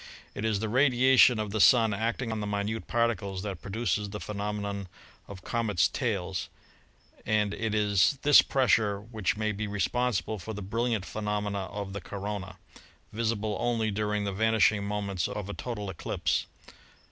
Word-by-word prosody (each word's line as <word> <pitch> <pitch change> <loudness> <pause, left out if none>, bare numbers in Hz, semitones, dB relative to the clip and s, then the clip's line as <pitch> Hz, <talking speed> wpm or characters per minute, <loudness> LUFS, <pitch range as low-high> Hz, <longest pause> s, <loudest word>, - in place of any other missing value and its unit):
It - - -5
is 110 -3 +1
the 110 - -2
radiation 130 0 +5
of 105 -2 -3
the 110 0 0
Sun 115 +2 +6
acting 115 +3 -2
on 110 - -2
the 105 - -3
minute 105 +2 -2
particles 110 -5 -1
that 95 -5 -5
produces 105 -1 -2
the 105 +1 -6
phenomenon 100 -1 -4 0.4
of 95 -2 -10
comets' 105 -9 +1
tails, 95 -8 -2 0.7
and 105 -1 +1
it 110 -1 -2
is 105 +4 +3
this 145 -1 +8
pressure 110 -6 +2
which 105 -3 -2
may 110 0 0
be 105 +1 -3
responsible 110 +1 -1
for 110 +5 -6
the 105 - -6
brilliant 115 0 -1
phenomena 105 -2 -2
of 100 0 -6
the 100 - -5
corona, 100 +1 -5 0.6
visible 110 -1 -1
only 115 -3 0
during 105 0 -1
the 100 -1 -2
vanishing 110 0 +3
moments 100 -3 -2
of 105 -2 -5
a - - -4
total 105 -4 -5
eclipse. 95 -3 -2
105 Hz, 160 wpm, -28 LUFS, 100-110 Hz, 0.7 s, this